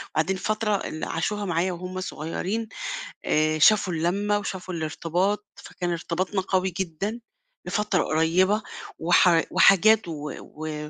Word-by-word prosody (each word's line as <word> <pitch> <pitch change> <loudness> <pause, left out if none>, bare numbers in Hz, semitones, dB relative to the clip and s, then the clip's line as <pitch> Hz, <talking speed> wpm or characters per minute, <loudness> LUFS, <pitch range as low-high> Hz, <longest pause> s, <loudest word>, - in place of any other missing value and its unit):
وبعدين 170 +5 +1
فترة 215 +1 0
اللي 155 -5 -4
عاشوها 205 +5 -2
معايا 175 0 0
وهُم 185 +1 -5
صغيرين، 185 +7 -3 0.6
آآ 155 0 +2
شافوا 195 +2 +5
اللمّة 195 +6 0
وشافوا 190 -2 -5
الارتباط، 175 +6 -1
فكان 175 -1 -5
ارتباطنا 180 +3 -2
قوي 185 -1 0
جدًا 195 +6 -3 0.5
لفترة 210 -4 +1
قريبة 180 +7 +2 0.4
وح 170 0 +5
وحاجات 205 +3 +5
و 150 -3 -5
و 150 -1 -7
180 Hz, 120 wpm, -25 LUFS, 165-200 Hz, 0.6 s, شافوا